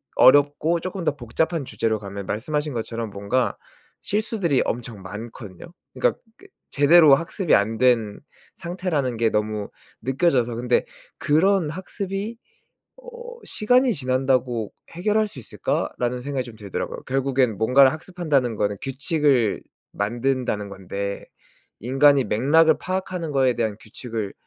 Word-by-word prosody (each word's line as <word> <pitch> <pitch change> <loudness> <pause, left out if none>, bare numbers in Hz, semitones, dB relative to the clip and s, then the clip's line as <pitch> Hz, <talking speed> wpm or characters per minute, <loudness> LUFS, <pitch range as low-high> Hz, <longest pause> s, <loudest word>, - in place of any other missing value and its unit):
어렵고 145 +4 +5
쪼끔 185 +1 -5
더 145 - 0
복잡한 145 +5 -2
주제로 110 -3 -1
가면 100 -1 -7
말씀하신 150 +8 -2
것처럼 115 -1 -4
뭔가 100 +6 -1 0.4
실수들이 205 - 0
엄청 115 -3 -4
많거든요. 105 0 -9 0.3
그러니까 - - 0 0.2
그 395 - -17 0.2
제대로 145 0 +6
학습이 170 +3 -1
안 110 +3 +1
된 115 -4 +2 0.4
상태라는 170 -9 -2
게 115 -1 +2
너무 105 -1 -2 0.3
느껴져서. 130 -2 +1
근데 120 +1 +1 0.3
그런 170 +2 +2
학습이 195 +5 -5 0.6
'어 - - -12 0.4
시간이 250 +3 +3
지난다고 130 -4 0 0.2
해결할 210 +5 +1
수 170 - -9
있을까?'라는 125 +1 -2
생각이 135 -1 -3
좀 115 -2 -11
들더라고요. 100 -3 -5
결국에는 130 -4 +1
뭔가를 130 +4 +5
학습한다는 155 -8 -1
거는 105 -1 -1
규칙을 135 - +1 0.3
만든다는 120 -1 -1
건데 100 +1 -5 0.5
'인간이 135 +3 +4
맥락을 150 +9 +4
파악하는 185 -3 -3
거에 130 -3 +3
대한 110 -3 -1
규칙을 110 -2 -6
130 Hz, 320 characters per minute, -23 LUFS, 115-165 Hz, 0.6 s, 제대로